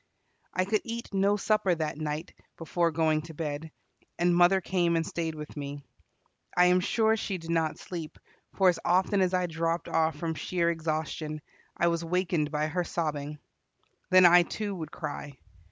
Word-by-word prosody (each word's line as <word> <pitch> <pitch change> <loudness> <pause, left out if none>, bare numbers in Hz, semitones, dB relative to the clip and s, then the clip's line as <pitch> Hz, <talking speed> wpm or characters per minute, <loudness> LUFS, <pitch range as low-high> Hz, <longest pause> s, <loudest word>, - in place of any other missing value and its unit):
I 185 - +2
could 210 +2 +1
eat 230 -2 -6
no 200 +1 +3
supper 210 -3 +2
that 155 -2 -2
night 155 +1 -4 0.2
before 170 +1 0
going 155 -1 +1
to 160 - -9
bed, 150 0 -4 0.5
and 175 0 +3
mother 175 +2 +5
came 175 -2 +1
and 165 0 +1
stayed 165 -1 -3
with 150 -1 -8
me. 145 -1 -6 0.7
I 180 - +7
am 180 - +4
sure 220 +4 +2
she 200 -3 -3
did 165 -1 -6
not 160 -2 0
sleep, 165 -4 -7 0.4
for 190 - +4
as 180 - +3
often 190 +2 +2
as 185 0 +2
I 180 0 +1
dropped 165 0 -2
off 160 0 +1
from 165 -2 -3
sheer 170 +2 0
exhaustion, 155 -1 -3 0.4
I 170 - +3
was 170 0 -1
wakened 170 -3 0
by 150 0 0
her 175 +3 -1
sobbing. 150 -3 -3 0.7
Then 185 0 +7
I, 175 0 +8
too, 205 +4 -3
would 160 -5 -6
cry. 140 -2 -6
170 Hz, 175 wpm, -28 LUFS, 155-185 Hz, 0.7 s, I